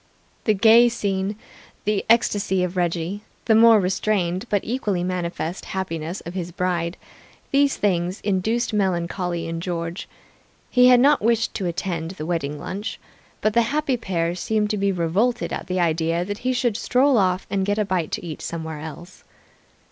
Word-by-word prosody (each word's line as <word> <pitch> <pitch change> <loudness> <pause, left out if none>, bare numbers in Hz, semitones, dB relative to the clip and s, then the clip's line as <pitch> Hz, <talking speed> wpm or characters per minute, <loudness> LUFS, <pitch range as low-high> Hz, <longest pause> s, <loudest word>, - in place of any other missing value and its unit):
The 215 - +3
gay 230 +4 +6
scene, 200 -3 -2 0.5
the 210 -1 +1
ecstasy 205 -5 +3
of 180 0 -3
Reggie, 175 +2 -1 0.2
the 225 - +4
more 225 0 +7
restrained 190 +1 0
but 205 -2 +1
equally 210 -7 -1
manifest 175 -1 -3
happiness 170 -1 -4
of 170 - -8
his 175 -2 -4
bride 175 -1 -1 0.5
these 280 0 +3
things 180 -2 0
induced 215 +4 0
melancholy 180 -3 -1
in 165 0 -4
George. 170 0 -4 0.6
He 250 0 +6
had 250 -1 +7
not 285 +3 +4
wished 230 +1 +1
to 190 - -2
attend 170 -1 -3
the 155 - -5
wedding 155 -4 -2
lunch, 200 +8 -5 0.4
but 215 - +1
the 235 - +5
happy 275 +3 0
pair 175 -7 -1
seemed 210 +4 -1
to 210 - -1
be 200 0 +1
revolted 195 +8 0
at - - -5
the 185 0 -1
idea 165 0 +1
that 205 +2 -5
he 255 - 0
should 240 -4 0
stroll 265 +3 +3
off 185 -1 +1
and 195 -1 +1
get 205 +2 0
a 210 - +1
bite 185 -5 -1
to - - -3
eat 160 -3 -6
somewhere 160 -2 -5
else. 160 +4 -10
190 Hz, 170 wpm, -23 LUFS, 170-220 Hz, 0.6 s, more